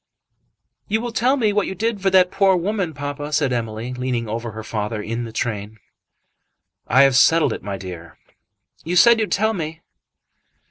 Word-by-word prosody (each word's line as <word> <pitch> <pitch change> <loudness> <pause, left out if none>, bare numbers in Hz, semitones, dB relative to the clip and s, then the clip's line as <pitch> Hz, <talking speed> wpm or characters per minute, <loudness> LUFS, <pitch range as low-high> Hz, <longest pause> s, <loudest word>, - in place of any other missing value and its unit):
"You 220 +2 0
will 240 +1 -4
tell 250 +5 +2
me 215 -5 +1
what 205 -1 +1
you 190 - -5
did 220 +1 -2
for 195 - +2
that 185 -1 +4
poor 195 -1 +3
woman, 180 -2 -2
papa," 145 +1 -5
said 145 -4 +1
Emily, 115 +1 -4
leaning 125 -2 -2
over 115 +2 -4
her 110 0 -7
father 105 -1 -3
in 115 +3 -4
the 115 - -8
train. 110 -2 -4 1.1
"I 130 +3 +5
have 135 -2 +4
settled 160 +5 +4
it, - - -7
my 100 -1 -5
dear." 85 -3 -9 0.7
"You 175 +2 -3
said 235 +5 +6
you'd 220 - -1
tell 220 +3 +1
me." 160 -3 -5
145 Hz, 180 wpm, -21 LUFS, -, 1.1 s, said